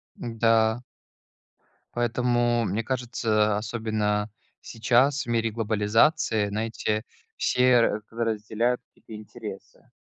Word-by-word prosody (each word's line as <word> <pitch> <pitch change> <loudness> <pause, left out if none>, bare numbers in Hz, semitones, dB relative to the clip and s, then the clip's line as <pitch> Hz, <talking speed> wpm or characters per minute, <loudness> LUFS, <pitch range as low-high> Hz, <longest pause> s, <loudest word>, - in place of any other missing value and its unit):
Да. 115 0 +1 1.1
Поэтому, 120 0 +1
мне 105 +4 -1
кажется, 115 -4 0
особенно 110 -2 -1 0.3
сейчас, 130 +5 +2
в - - -15
мире 115 -1 0
глобализации, 110 +2 +2
знаете, 110 0 -2 0.3
все 125 -1 +3
ра 105 -2 +1 0.2
разделяют 115 +3 -1
какие-то 110 - -12
интересы. 105 -3 -10
115 Hz, 90 wpm, -26 LUFS, 110-120 Hz, 1.1 s, все